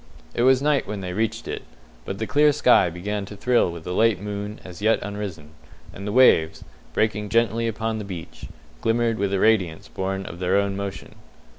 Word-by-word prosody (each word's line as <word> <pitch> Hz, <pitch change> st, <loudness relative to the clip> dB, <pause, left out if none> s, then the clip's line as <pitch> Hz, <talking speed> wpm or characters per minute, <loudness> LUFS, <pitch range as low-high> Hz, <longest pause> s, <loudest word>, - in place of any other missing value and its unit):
It -, -, -1 dB
was 130 Hz, +2 st, +4 dB
night 145 Hz, -7 st, +2 dB
when 105 Hz, -1 st, -4 dB
they 90 Hz, -1 st, -4 dB
reached 110 Hz, +3 st, -2 dB
it, -, -, -4 dB, 0.4 s
but 95 Hz, -, -4 dB
the 110 Hz, -, -2 dB
clear 150 Hz, +7 st, +4 dB
sky 125 Hz, -10 st, +4 dB
began 100 Hz, +4 st, -4 dB
to 105 Hz, -, -10 dB
thrill 120 Hz, -2 st, +2 dB
with 85 Hz, -1 st, -9 dB
a -, -, -4 dB
late 110 Hz, -1 st, +3 dB
moon 105 Hz, +1 st, -5 dB
as 90 Hz, +1 st, -10 dB
yet 110 Hz, +2 st, +3 dB
unrisen, 100 Hz, -7 st, -6 dB, 0.4 s
and 100 Hz, +2 st, -7 dB
the -, -, -2 dB
waves, 105 Hz, -10 st, +4 dB, 0.3 s
breaking 105 Hz, -1 st, 0 dB
gently 115 Hz, +1 st, +2 dB
upon 110 Hz, 0 st, -2 dB
the -, -, -4 dB
beach, 90 Hz, -5 st, -8 dB, 0.4 s
glimmered 115 Hz, -1 st, +1 dB
with 100 Hz, -1 st, 0 dB
a 100 Hz, -, +1 dB
radiance 95 Hz, -8 st, +2 dB
born 95 Hz, 0 st, -3 dB
of 85 Hz, -, -8 dB
their 90 Hz, +2 st, +2 dB
own 100 Hz, -1 st, 0 dB
motion. 100 Hz, 0 st, -6 dB
105 Hz, 195 wpm, -24 LUFS, 95-115 Hz, 0.4 s, was